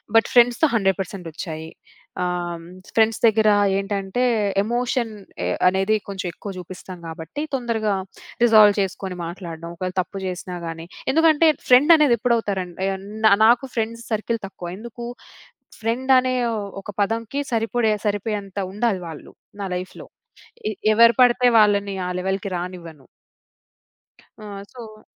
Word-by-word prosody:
But 225 - +5
ఫ్రెండ్స్‌తో 245 +5 +5
100% 195 -3 -1
ఒచ్చాయి. 160 -1 -6 0.5
ఆహ్, 175 -1 -3 0.3
ఫ్రెండ్స్ 225 0 +3
దెగ్గర 220 -1 +4 0.3
ఏంటంటే, 195 +3 -2 0.4
ఎమోషన్ 240 +1 -1 0.3
అ - - 0 0.2
అనేది 195 +3 +2
కొంచెం 195 -2 -4
ఎక్కువ 200 - -7
జూపిస్తాం 180 +1 -9
గాబట్టి 165 - -6
తొందరగా 230 -5 0 0.5
రిజాల్వ్ 215 -3 +7
చేసుకొని 190 -1 -4
మాట్లాడడం. 170 -1 -7
ఒకవేళ 185 +1 -4
తప్పు 195 +2 -7
జేసినా 180 0 -5
గాని, 165 0 -6 0.3
ఎందుకంటే, 320 +1 +4 0.2
ఫ్రెండ్ 270 +7 +7
అనేదెప్పుడవుతారండి, 220 - +1 0.4
నా 220 - +7
నాకు 240 +3 +4
ఫ్రెండ్స్ 230 0 -2
సర్కిల్ 225 +2 -1
తక్కువ. 175 -2 -8
ఎందుకు, 235 +2 -8 0.8
ఫ్రెండ్ 245 +4 0
అనే 255 0 -1 0.5
ఒక 195 - -12
పదంకి 225 +6 -1
సరిపడే 225 -1 +1
సరిపోయేంత 205 -1 -2
ఉండాలి 210 -2 0
వాళ్ళు 160 -2 -10 0.3
నా - - -2
లైఫ్‌లో. 180 +1 -7 0.6
ఎ - - -2 0.2
ఎవరు 230 +2 +7
పడితే 245 0 +5
వాళ్ళని 200 -2 +3
ఆ - - -2
లెవెల్‌కి 190 +2 -2
రానివ్వను. 170 -5 -8 1.3
ఆ! - - -12 0.3
సో 220 -3 -11
210 Hz, 120 wpm, -22 LUFS, 185-235 Hz, 1.3 s, రిజాల్వ్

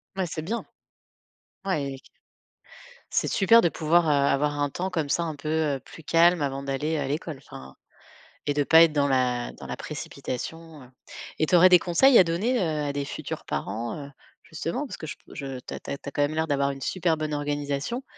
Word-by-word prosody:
Bah, 190 -1 0
c'est 160 -2 -5
bien. 220 +9 -3 1.0
Ouais 150 -8 -1
et 135 - -9
q - - -21 1.0
C'est - - +1
super 230 +4 +5
de 170 - +3
pouvoir, 165 +2 +2
heu, - - +2
avoir 145 +1 +2
un 145 0 +1
temps 185 +6 -4
comme 160 -5 -2
ça, 170 +4 +1
un 160 -2 -4
peu, 155 +2 -6
heu, 155 -3 0
plus 160 +5 -14
calme 170 +1 +4
avant 135 -1 -2
d'aller 145 +3 -2
à 145 - -2
l'école, 150 +1 -3
enfin. 65 - -12 0.7
Et 145 - +2
de 145 0 +1
pas 160 +3 +7
être 165 -2 +3
dans 145 -1 +2
la 125 -2 0
dans - - -11
la - - -4
précipitation, 160 +3 -7
heu. 125 - -16 0.5
Et 155 - +2
tu - - +3
aurais 180 +1 +8
des 180 -1 +8
conseils 210 +10 +5
à - - +8
donner, 205 +10 0
heu, 155 -3 -1
à 140 - -2
des 140 0 -2
futurs - - -6
parents, 115 +4 -3
heu, 140 -1 -8 0.3
justement, - - -4
parce - - -8
que - - -7
je - - -6
p - - -33
je 135 -2 -6
tu - - -9
as - - -5
tu - - -11
as 140 - -3
tu - - -14
as 140 - -3
quand 145 - -1
même 145 +2 +1
l'air 160 0 0
d'avoir 140 -1 +1
une 135 -1 -6
super 170 +1 0
bonne 155 -1 -3
organisation. 145 - -2
150 Hz, 230 wpm, -26 LUFS, 140-170 Hz, 1.0 s, aurais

